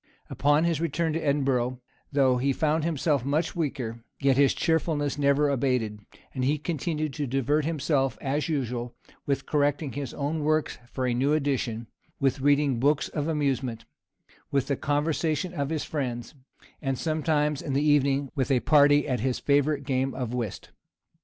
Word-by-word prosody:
Upon 145 +2 +3
his 165 -2 0
return 165 0 0
to 165 - -1
Edinburgh, 135 -4 0 0.3
though 135 -3 +3
he 135 +2 +1
found 155 +2 +1
himself 150 -4 0
much 150 +5 0
weaker, 130 -8 -3 0.2
yet 135 -1 +3
his 140 0 +4
cheerfulness 150 -3 0
never 140 +1 +3
abated, 125 -6 0 0.3
and 130 - -2
he 145 +4 +2
continued 155 -1 -2
to 145 0 -3
divert 135 +4 +1
himself, 140 -6 0
as 145 +4 -1
usual, 125 -5 -2 0.3
with 140 -1 0
correcting 145 -1 0
his 140 -4 -5
own 150 +2 -2
works 155 +1 0
for 130 - -2
a 125 - +1
new 135 +5 +2
edition, 130 -6 -1 0.3
with 135 -1 +1
reading 145 -3 +3
books 145 +3 +2
of 150 -1 -3
amusement, 135 -7 -1 0.6
with 140 -2 +1
the 140 - 0
conversation 155 +4 -1
of 140 -4 -2
his 160 -2 -2
friends; 125 -5 -4 0.5
and, 135 -3 -1
sometimes 150 -2 0
in 140 - -4
the 140 +2 +1
evening, 140 -2 +2
with 135 -3 -1
a 130 -3 +3
party 145 -1 +5
at 130 -3 0
his 125 +2 0
favorite 145 0 +1
game 130 -1 -1
of 125 -2 -3
whist. 120 -5 -4
140 Hz, 165 wpm, -27 LUFS, 130-150 Hz, 0.6 s, party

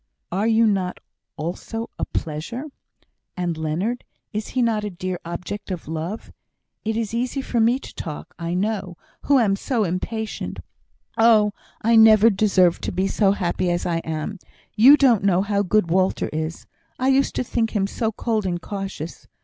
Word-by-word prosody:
"Are 195 +5 0
you 230 0 +4
not 190 -4 0 0.4
also 185 +8 -4
a - - 0
pleasure? 165 - -4 0.7
And 175 -2 -1
Leonard, 165 +10 -2 0.3
is 215 0 -3
he 255 - 0
not 220 -3 +1
a 210 - -2
dear 185 -1 -4
object 180 +5 -6
of 180 -5 -5
love? 165 +7 -5 0.5
It 220 0 -1
is 225 -2 -2
easy 250 +3 -1
for 250 -3 -1
me 230 +3 +4
to - - -11
talk, 165 +2 -7
I 170 +1 -2
know, 195 -2 -2 0.3
who 285 - +5
am 210 -6 +3
so 230 +2 -1
impatient. 215 +5 -3 0.6
Oh, 220 -2 +5 0.3
I 230 +1 +4
never 220 0 +7
deserved 190 -4 +3
to - - -1
be 190 - 0
so 195 -1 +3
happy 180 -2 -1
as 175 0 -1
I 170 -1 0
am! 160 +5 -4 0.4
You 260 +7 +8
don't 245 -8 +4
know 190 -1 +3
how 200 0 +1
good 200 -2 +1
Walter 185 +1 +1
is. 155 +1 -4 0.3
I 260 +1 +1
used 270 +1 +2
to - - 0
think 230 -2 -1
him 195 -2 +2
so 220 +2 -2
cold 220 -2 -1
and 175 -1 -1
cautious. 195 -3 -6
200 Hz, 175 wpm, -23 LUFS, 175-225 Hz, 0.7 s, You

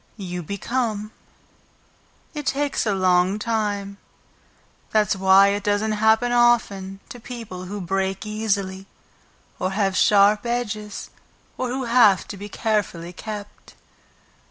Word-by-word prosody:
"You 180 -3 -5
become. 215 +4 -3 1.2
It 295 -3 -6
takes 285 -3 0
a 205 - +1
long 185 +1 +2
time. 205 -3 -2 0.9
That's 210 -2 +2
why 190 +1 +6
it 205 +1 -1
doesn't 205 +1 +1
happen 220 +3 +3
often 205 -5 +2
to 245 - -9
people 225 -7 -8
who 205 +3 -6
break 195 +2 -2
easily, 200 -3 -2 0.7
or 185 - 0
have 195 -2 0
sharp 205 +1 +4
edges, 215 -4 -4 0.4
or 255 - -2
who 260 +2 -2
have 230 -6 +4
to - - -5
be 205 +2 -8
carefully 200 -6 -2
kept. 205 +2 -9
205 Hz, 120 wpm, -23 LUFS, 195-225 Hz, 1.2 s, why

